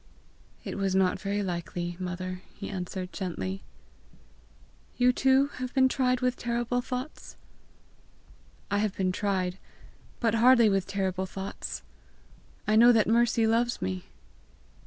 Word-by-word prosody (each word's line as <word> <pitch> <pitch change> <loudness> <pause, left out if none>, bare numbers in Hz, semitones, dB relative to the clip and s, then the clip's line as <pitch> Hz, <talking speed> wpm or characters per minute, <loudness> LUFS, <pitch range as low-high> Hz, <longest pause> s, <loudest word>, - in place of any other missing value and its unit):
"It - - -5
was 195 -1 0
not 190 -1 +2
very 205 0 -1
likely, 175 -1 -3
mother!" 185 0 -4
he - - -6
answered 185 -1 -5
gently. 95 - -4 1.4
"You 250 0 +4
too 265 +2 +3
have 255 +1 -5
been 260 -1 +6
tried 255 -1 +1
with 250 0 +1
terrible 240 +1 -1
thoughts?" 255 +3 -6 1.3
"I 205 - +2
have 210 -2 -1
been 185 -1 +1
tried, 185 -1 -1 0.6
but 230 -3 +1
hardly 235 0 +6
with 195 -2 0
terrible 190 -1 -1
thoughts: 190 +1 -6 0.8
I 215 - +3
know 235 +2 +8
that 225 -3 +4
Mercy 230 0 +3
loves 235 +2 +1
me!" 95 -1 -3
205 Hz, 130 wpm, -28 LUFS, 185-240 Hz, 1.4 s, know